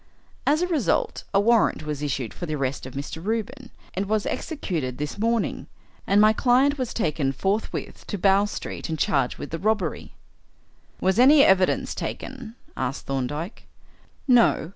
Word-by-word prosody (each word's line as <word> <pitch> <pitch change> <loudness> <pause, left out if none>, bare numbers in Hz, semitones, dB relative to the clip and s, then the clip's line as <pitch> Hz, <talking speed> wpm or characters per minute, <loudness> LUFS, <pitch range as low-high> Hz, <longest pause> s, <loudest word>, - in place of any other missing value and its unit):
As 305 +4 +3
a - - +1
result, 315 -9 0
a 195 - +3
warrant 225 -5 +3
was 150 -1 -4
issued 135 -5 -3
for 175 - -6
the 155 - -2
arrest 135 -2 -3
of 130 - -11
Mr. 145 +4 -6
Reuben, 230 +4 -3 0.2
and 195 +2 -2
was 215 0 0
executed 165 - -3
this 150 +6 -5
morning, 230 +1 0 0.4
and 200 - +4
my 215 +1 +6
client 265 +5 +3
was 255 -3 -2
taken 150 - 0
forthwith 195 +10 -3
to 205 - -3
Bow 195 +2 +4
Street 205 - -6
and 160 - -2
charged 135 -4 +1
with - - -7
the 165 - -3
robbery." 205 -5 -1 0.8
"Was 190 +4 +1
any 280 +3 +8
evidence 190 -4 +3
taken?" 250 -4 -6 0.2
asked 130 +1 -3
Thorndyke. 145 - -4 0.6
"No. 240 - +4
195 Hz, 160 wpm, -24 LUFS, 150-230 Hz, 0.8 s, any